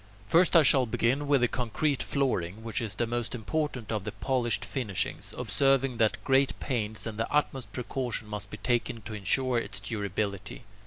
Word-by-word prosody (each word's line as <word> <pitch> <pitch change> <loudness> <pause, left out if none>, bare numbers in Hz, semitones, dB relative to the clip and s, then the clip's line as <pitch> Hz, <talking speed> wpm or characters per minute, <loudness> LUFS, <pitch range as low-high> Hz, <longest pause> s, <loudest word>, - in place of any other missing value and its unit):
First 170 - +4
I 165 - +8
shall 130 -2 +5
begin 130 +6 +1
with 140 -3 +4
the 125 - +4
concrete 130 +4 -1
flooring, 110 -8 -1
which 115 -2 -2
is 105 -4 -4
the 120 - 0
most 120 +1 -3
important 125 -1 -2
of 105 -3 -1
the 105 - -4
polished 120 -6 0
finishings, 105 -3 -2
observing 125 +3 +2
that 110 -1 +1
great 135 0 +2
pains 110 -5 -2
and 110 -1 -5
the 115 - -1
utmost 135 -6 0
precaution 125 -1 -3
must 105 -1 -5
be 105 - -7
taken 115 +1 -1
to 110 - -7
ensure 120 +5 +1
its 100 -3 -5
durability. 100 +1 -3
115 Hz, 175 wpm, -29 LUFS, 105-130 Hz, -, I